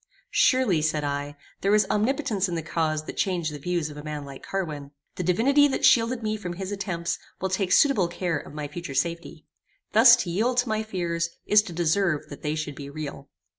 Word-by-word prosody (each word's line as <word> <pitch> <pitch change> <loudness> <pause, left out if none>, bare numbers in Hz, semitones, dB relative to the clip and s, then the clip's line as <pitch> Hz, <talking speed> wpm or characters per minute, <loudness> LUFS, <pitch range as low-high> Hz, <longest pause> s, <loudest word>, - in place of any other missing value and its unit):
"Surely," 250 - +3
said 155 -1 0
I, 145 0 -3 0.3
"there 200 +2 +3
is 210 -1 +4
omnipotence 215 -3 0
in 175 - -3
the 165 - -3
cause 155 -1 -1
that - - -8
changed 175 -5 -1
the 145 - -7
views 170 0 -2
of 150 - -11
a 150 - -8
man 150 -1 -5
like 140 -1 -10
Carwin. 155 -7 -4 0.2
The - - -5
divinity 250 - +4
that 270 - 0
shielded 230 0 +4
me 215 0 -1
from 180 -4 -5
his 190 +2 -5
attempts 190 -4 -3 0.2
will 190 - -1
take 190 -1 -1
suitable 240 -10 +4
care 175 -1 -2
of - - -11
my 150 -1 -4
future 150 -1 -7
safety. 170 +4 -2 0.5
Thus 235 +2 +8
to 175 - -5
yield 235 +8 0
to 245 -1 +2
my 215 0 0
fears 170 -5 -2 0.2
is 210 0 +5
to 190 -4 -9
deserve 170 -1 0
that 145 - -10
they 150 +1 -2
should 155 -2 -4
be 140 0 -8
real." 145 -2 -7
175 Hz, 210 wpm, -25 LUFS, 155-210 Hz, 0.5 s, Thus